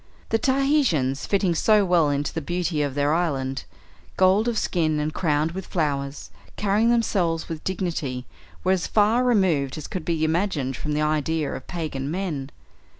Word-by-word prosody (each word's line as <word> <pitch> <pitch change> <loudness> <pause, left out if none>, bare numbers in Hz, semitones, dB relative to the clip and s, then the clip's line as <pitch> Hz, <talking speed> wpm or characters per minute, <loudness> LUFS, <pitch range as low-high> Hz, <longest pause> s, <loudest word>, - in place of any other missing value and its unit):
The 225 - +2
Tahitians, 260 - +1
fitting 195 -3 +2
so 210 +4 +4
well 170 -4 +3
into 145 0 -1
the 160 - -3
beauty 175 0 -1
of 140 -2 -2
their 145 +1 +2
island, 135 -6 -1 0.5
gold 190 +4 +4
of 235 -2 0
skin 155 -6 0
and 150 +1 -2
crowned 155 -1 +1
with 190 +1 -6
flowers, 140 -4 -2 0.2
carrying 210 +3 +2
themselves 185 -9 +1
with 160 -2 -6
dignity, 160 -9 -3 0.4
were 185 - +2
as 185 -3 +1
far 220 +4 +3
removed 185 - +2
as 155 - -6
could 185 - -5
be 165 -2 -1
imagined 160 -5 0
from 150 +4 -3
the 150 +1 +1
idea 155 0 0
of - - -8
pagan 150 -6 -4
men. 160 -6 -3
165 Hz, 165 wpm, -24 LUFS, 145-190 Hz, 0.5 s, so